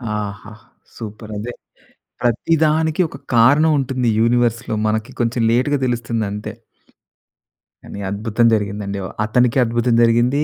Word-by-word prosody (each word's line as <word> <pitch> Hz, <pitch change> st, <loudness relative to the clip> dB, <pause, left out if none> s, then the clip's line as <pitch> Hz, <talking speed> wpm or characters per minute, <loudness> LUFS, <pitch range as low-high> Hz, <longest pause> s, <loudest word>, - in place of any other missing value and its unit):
ఆహా! 105 Hz, +1 st, -6 dB, 0.4 s
సూపర్. 110 Hz, -1 st, -8 dB
అదే, 120 Hz, +4 st, -5 dB, 0.7 s
ప్రతిదానికి 155 Hz, +6 st, +1 dB
ఒక 140 Hz, -, -10 dB, 0.2 s
కారణం 145 Hz, +7 st, +5 dB
ఉంటుంది 130 Hz, -2 st, -1 dB
యూనివర్స్‌లో. 120 Hz, -1 st, +1 dB
మనకి 110 Hz, +4 st, -2 dB
కొంచెం 120 Hz, +1 st, 0 dB
లేట్‌గ 130 Hz, +5 st, +2 dB
తెలుస్తుంది 115 Hz, -2 st, -2 dB
అంతే. 105 Hz, +1 st, -6 dB, 1.3 s
కానీ 100 Hz, -, -9 dB
అద్భుతం 110 Hz, +3 st, 0 dB
జరిగిందండి. 100 Hz, -1 st, -2 dB
వ -, -, -4 dB, 0.2 s
అతనికి 125 Hz, +3 st, +2 dB
అద్భుతం 120 Hz, +1 st, 0 dB
జరిగింది. 120 Hz, +5 st, +3 dB
115 Hz, 115 wpm, -19 LUFS, 110-125 Hz, 1.3 s, కారణం